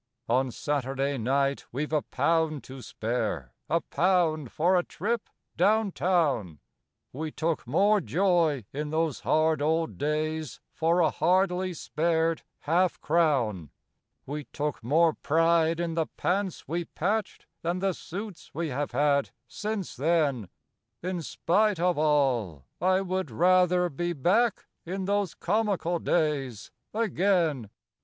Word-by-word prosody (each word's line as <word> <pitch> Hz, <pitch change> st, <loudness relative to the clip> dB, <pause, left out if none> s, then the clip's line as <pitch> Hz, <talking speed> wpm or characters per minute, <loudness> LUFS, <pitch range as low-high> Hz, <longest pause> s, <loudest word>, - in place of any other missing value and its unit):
On 130 Hz, +3 st, +2 dB
Saturday 135 Hz, +1 st, -2 dB
night 135 Hz, +4 st, 0 dB
we've 150 Hz, +5 st, -3 dB
a 150 Hz, -, +3 dB
pound 155 Hz, +2 st, 0 dB
to 130 Hz, 0 st, -10 dB
spare 110 Hz, -, -3 dB, 0.2 s
a 165 Hz, +3 st, +2 dB
pound 165 Hz, -7 st, +1 dB
for 175 Hz, +4 st, +2 dB
a 180 Hz, -, +4 dB
trip 215 Hz, +7 st, -3 dB, 0.3 s
down 215 Hz, -1 st, +3 dB
town 145 Hz, -, 0 dB, 0.6 s
We 155 Hz, +4 st, -4 dB
took 160 Hz, -5 st, -2 dB
more 205 Hz, -, +3 dB
joy 165 Hz, -, +1 dB
in 150 Hz, +2 st, -3 dB
those 160 Hz, -2 st, 0 dB
hard 155 Hz, -1 st, +2 dB
old 160 Hz, +2 st, 0 dB
days 155 Hz, 0 st, -2 dB
for 170 Hz, +2 st, +2 dB
a 160 Hz, -, +3 dB
hardly 185 Hz, +1 st, +1 dB
spared 165 Hz, +1 st, 0 dB, 0.2 s
half 175 Hz, +4 st, +1 dB
crown; 130 Hz, -, +1 dB, 0.6 s
We 145 Hz, +1 st, -5 dB
took 145 Hz, -4 st, -4 dB
more 160 Hz, +6 st, +3 dB
pride 165 Hz, +1 st, +2 dB
in 170 Hz, -1 st, -1 dB
the 160 Hz, -1 st, 0 dB
pants 190 Hz, -1 st, -1 dB
we 170 Hz, +2 st, -2 dB
patched 205 Hz, +7 st, -2 dB, 0.2 s
than 170 Hz, +2 st, -1 dB
the 190 Hz, 0 st, 0 dB
suits 195 Hz, +2 st, -8 dB
we 165 Hz, -1 st, -2 dB
have 145 Hz, +2 st, -3 dB
had 145 Hz, -1 st, +2 dB, 0.2 s
since 210 Hz, -4 st, -4 dB
then 140 Hz, -, +1 dB, 0.5 s
In 180 Hz, -1 st, -2 dB
spite 200 Hz, +4 st, +1 dB
of 175 Hz, -2 st, +1 dB
all, 130 Hz, -, +1 dB, 0.2 s
I 185 Hz, +1 st, +3 dB
would 185 Hz, -3 st, -2 dB
rather 180 Hz, +6 st, +3 dB
be 175 Hz, +3 st, -3 dB
back 200 Hz, -, +2 dB, 0.2 s
in 190 Hz, +2 st, -4 dB
those 200 Hz, -2 st, 0 dB
comical 195 Hz, -4 st, 0 dB
days 140 Hz, -11 st, -1 dB, 0.2 s
again. 180 Hz, -, +1 dB
165 Hz, 130 wpm, -27 LUFS, 145-180 Hz, 0.6 s, a